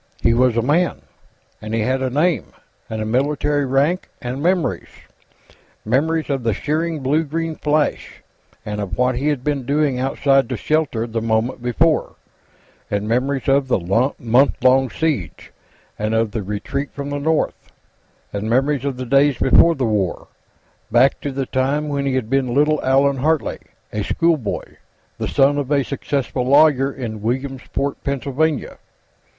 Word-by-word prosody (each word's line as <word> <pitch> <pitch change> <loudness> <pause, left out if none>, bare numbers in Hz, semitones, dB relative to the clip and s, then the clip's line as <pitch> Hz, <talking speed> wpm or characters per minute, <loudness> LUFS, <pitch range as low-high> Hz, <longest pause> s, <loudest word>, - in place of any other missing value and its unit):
He 115 - +4
was 125 -1 +2
a 115 - +2
man, 165 +7 +1 0.6
and 110 +1 -4
he 115 - 0
had 130 +4 0
a 130 - 0
name, 155 +6 0 0.4
and 110 -1 -3
a - - -4
military 145 +4 0
rank, 145 +8 +1
and 125 +3 -5
memories. 180 +1 0 1.0
Memories 155 +8 +1
of 135 -2 -1
the 115 -4 0
searing 160 +1 -2
blue 145 +5 +1
green 165 +2 -3
flash, 150 0 -1 0.4
and 105 0 -3
of 95 -2 -4
what 125 +1 +2
he 130 +4 -2
had 145 -4 0
been 145 -2 -1
doing 140 0 0
outside 135 +1 +2
the 125 - -2
shelter 145 -3 0
the 115 -1 -3
moment 115 +3 0
before, 150 +7 +1 0.7
and 105 0 -2
memories 130 +3 0
of 135 0 +3
the 130 - +2 0.4
month 120 +4 +2
long 130 0 +4
siege, 130 - -3 0.5
and 110 +1 -1
of 115 -1 +1
the 110 - -3
retreat 135 +9 -4
from 140 0 -5
the 145 - -2
north, 160 +2 -1 0.6
and 105 +2 -3
memories 135 +3 +1
of 135 -3 -2
the 130 - -4
days 140 +2 +3
before 165 +6 +5
the 135 -3 -1
War, 105 -5 -1 0.6
back 125 +4 +4
to 145 - -3
the 135 0 -2
time 140 +4 -1
when 140 -1 -1
he 135 - 0
had 130 -4 -1
been 130 -1 0
little 150 +1 +2
Allan 135 +1 +3
Hartley, 155 +3 0 0.3
a 105 - -1
schoolboy, 160 -9 0 0.6
the - - -2
son 145 +1 +3
of 140 -2 -3
a 145 -2 +2
successful 135 -2 -2
lawyer, 140 -1 +4
in 115 -6 -6
Williamsport, 135 +3 -3
Pennsylvania. 140 +2 -1
135 Hz, 160 wpm, -20 LUFS, 120-145 Hz, 1.0 s, before